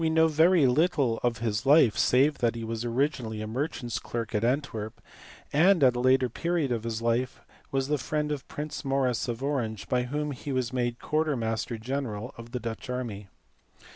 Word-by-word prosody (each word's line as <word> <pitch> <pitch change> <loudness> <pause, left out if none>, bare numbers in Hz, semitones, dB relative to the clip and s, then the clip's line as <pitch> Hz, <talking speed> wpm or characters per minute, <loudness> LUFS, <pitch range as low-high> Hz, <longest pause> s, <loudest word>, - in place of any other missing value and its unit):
know 160 0 +4
very 160 +1 +4
little 135 -3 +2
of 120 -2 0
his 110 -1 -1
life 140 -6 +5
save 140 +4 +3
that 120 -1 +1
he 115 - -5
was 115 0 -3
originally 120 -2 -1
a 110 - -4
merchant 120 +1 -3
s 115 - -1
clerk 115 -1 -5
at 105 0 0
Antwerp, 120 -4 -2 0.5
and 170 +2 +5
at 125 -2 +5
a - - -1
later 130 +1 +4
period 165 +2 -1
of 115 -2 -1
his 115 -1 -3
life 120 +2 0 0.3
was 135 -1 0
the 150 0 0
friend 150 +1 -2
of 145 -3 -4
Prince 150 +1 -5
Maurice 135 -3 0
of 120 +2 -4
Orange 120 -7 -2
by 125 -1 +1
whom 150 +3 -2
he 140 +1 -6
was 130 -1 -1
made 120 -1 -1
quarter 155 +1 0
master 115 0 -2
general 125 -1 -4
of 115 -1 -11
the 125 - -3
Dutch 115 +1 -6
army. 115 -6 -4
125 Hz, 195 wpm, -28 LUFS, 115-145 Hz, 0.5 s, life